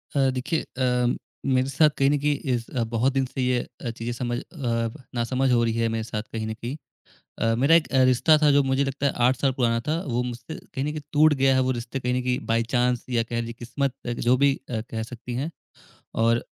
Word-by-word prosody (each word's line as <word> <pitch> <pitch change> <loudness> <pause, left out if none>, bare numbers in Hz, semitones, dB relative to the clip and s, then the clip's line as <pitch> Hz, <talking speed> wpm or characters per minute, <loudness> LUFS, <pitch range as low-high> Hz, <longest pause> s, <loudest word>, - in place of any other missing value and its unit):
अ, 135 -1 +4
देखिए 130 +5 -1
अ, 125 -1 0 0.3
मेरे 130 0 +2
साथ 150 +3 +4
कहीं 135 0 +4
न 145 - +3
कहीं 145 +1 +1 0.2
इस 120 -1 -3
अ, 120 - -1
बहुत 120 +4 0
दिन 135 -1 +1
से 130 +1 -5
यह 125 -1 -2
चीज़ 115 +1 -3
समझ 120 -1 -2
अ, - - -9 0.7
ना 120 - +1
समझ 130 +2 +1
हो 120 -1 +4
रही 115 -1 +1
है 115 0 +1
मेरे 115 0 -2
साथ 110 -1 -4
कहीं 110 -1 -3
न 110 - -3
कहीं 120 +4 -5 0.6
अ, 115 0 +2
मेरा 140 +7 +4
एक 160 -5 +4
अ, 130 -1 +5
रिश्ता 130 +5 +5
था 150 - +6
जो 140 0 +5
मुझे 135 +1 +1
लगता 135 +1 -1
है 140 - +2
8 130 +1 +3
साल 135 -2 +1
पुराना 120 -3 +1
था, 160 +2 +1
वो 120 -2 0
मुझसे 125 +4 -6
कहीं 135 0 -5
न 150 - -1
कहीं 155 - -5
टूट 150 +1 +5
गया 135 -1 +3
है 130 - +3
वो - - +2
रिश्ता 120 +3 -5
कहीं 125 -1 -1
न 125 - 0
कहीं 125 0 0
बाय 115 0 +2
चाँस 125 -1 +2
या 120 -2 +2
कह 115 0 -3
लीजिए 115 0 -4
क़िस्मत 135 +2 -2
एक 120 -1 -3
जो 125 - +6
भी 140 -1 +5 0.2
अ, 115 -3 -1
कह 110 -1 -3
सकती 120 +1 -7
हैं 140 +7 -2 0.7
और 115 +1 +2
125 Hz, 245 wpm, -25 LUFS, 120-135 Hz, 0.7 s, था